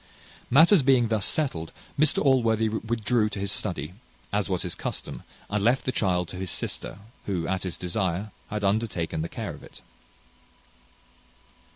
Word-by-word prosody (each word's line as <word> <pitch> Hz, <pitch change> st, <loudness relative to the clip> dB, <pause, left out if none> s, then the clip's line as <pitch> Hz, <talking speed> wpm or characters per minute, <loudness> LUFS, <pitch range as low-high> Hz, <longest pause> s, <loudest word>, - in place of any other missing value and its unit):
Matters 165 Hz, -, +7 dB
being 130 Hz, -3 st, +4 dB
thus 110 Hz, -4 st, +2 dB
settled, 85 Hz, -, -1 dB, 0.2 s
Mr 150 Hz, 0 st, +3 dB
Allworthy 115 Hz, -5 st, +3 dB
withdrew 110 Hz, 0 st, 0 dB
to 105 Hz, -, -6 dB
his 100 Hz, -1 st, 0 dB
study, 85 Hz, -6 st, -1 dB, 0.4 s
as 105 Hz, -1 st, 0 dB
was 90 Hz, -2 st, 0 dB
his -, -, -3 dB
custom, -, -, -5 dB, 0.3 s
and 105 Hz, 0 st, -1 dB
left 120 Hz, +4 st, +3 dB
the 130 Hz, -, +1 dB
child 90 Hz, -6 st, +1 dB
to 90 Hz, -, -7 dB
his 95 Hz, -1 st, -3 dB
sister, 85 Hz, -, -2 dB, 0.3 s
who, 90 Hz, -5 st, -1 dB
at 95 Hz, -1 st, -1 dB
his 90 Hz, -3 st, -4 dB
desire, 95 Hz, +2 st, -2 dB, 0.2 s
had 105 Hz, 0 st, -3 dB
undertaken 100 Hz, -6 st, 0 dB
the 85 Hz, -, -3 dB
care -, -, -5 dB
of -, -, -12 dB
it. -, -, -14 dB
105 Hz, 160 wpm, -26 LUFS, 90-115 Hz, 0.4 s, Matters